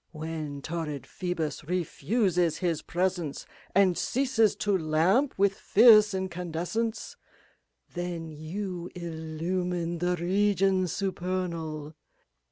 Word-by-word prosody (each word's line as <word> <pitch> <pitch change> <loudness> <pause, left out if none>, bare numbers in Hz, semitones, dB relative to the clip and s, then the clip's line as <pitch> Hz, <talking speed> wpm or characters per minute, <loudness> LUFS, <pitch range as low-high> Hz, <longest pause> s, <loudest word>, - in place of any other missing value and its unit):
When 155 -3 -5
torrid 155 -5 -4
Phoebus 175 -5 -3
refuses 180 - 0
his 170 -4 -1
presence 175 -4 -2 0.3
And 190 -2 +5
ceases 245 -4 +2
to 205 -1 0
lamp 175 - +2
with 200 0 +3
fierce 215 0 +6
incandescence^ 190 - -3 0.8
Then 175 -2 -4
you 175 +3 -5
illumine 170 +1 -3
the 180 +1 +1
regions 190 0 +2
supernal. 175 -5 -3
180 Hz, 90 wpm, -28 LUFS, 160-195 Hz, 0.8 s, fierce